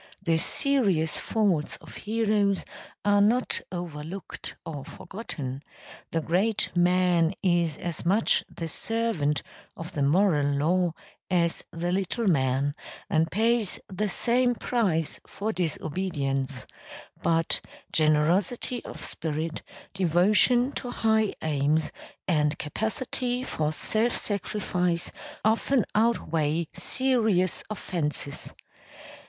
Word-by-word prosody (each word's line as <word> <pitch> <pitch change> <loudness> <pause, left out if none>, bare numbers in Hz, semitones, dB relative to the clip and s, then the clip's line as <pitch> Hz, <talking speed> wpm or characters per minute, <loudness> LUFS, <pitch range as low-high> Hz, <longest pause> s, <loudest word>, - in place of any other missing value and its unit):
The 165 -3 +2
serious 195 - +1
faults 190 -9 +1
of - - -13
heroes 210 -2 +1 0.4
are 205 0 +5
not 235 +5 +3
overlooked 175 0 -6
or 145 -4 -5
forgotten; 140 - -6 0.5
the 165 - 0
great 200 +7 +1
man 175 -1 +3
is 175 -4 +2
as 170 -3 -5
much 200 +6 +3
the 165 - -5
servant 200 -7 -1 0.3
of 165 0 -6
the 145 - -3
moral 145 -2 +3
law 175 +3 +2 0.4
as 170 -2 +1
the 170 +1 -2
little 195 +5 -1
man, 140 -4 +2 0.4
and 160 +1 +3
pays 225 0 +1
the 205 +2 -1
same 245 +3 +2
price 190 -12 0
for 215 +2 -3
disobedience; 145 -6 -2 0.6
but 165 -1 +2 0.3
generosity 170 +11 +2
of - - -8
spirit, 160 0 -3 0.3
devotion 200 - +4
to 250 - -5
high 220 -3 +2
aims 150 +1 +1 0.4
and 150 -3 +2
capacity 245 - -2
for 155 -11 -1
self 220 +9 0
sacrifice 180 -4 -1 0.3
often 230 +3 +3
outweigh 165 -8 +1
serious 220 -9 +1
offences. 155 -9 -3
180 Hz, 100 wpm, -27 LUFS, 155-215 Hz, 0.6 s, are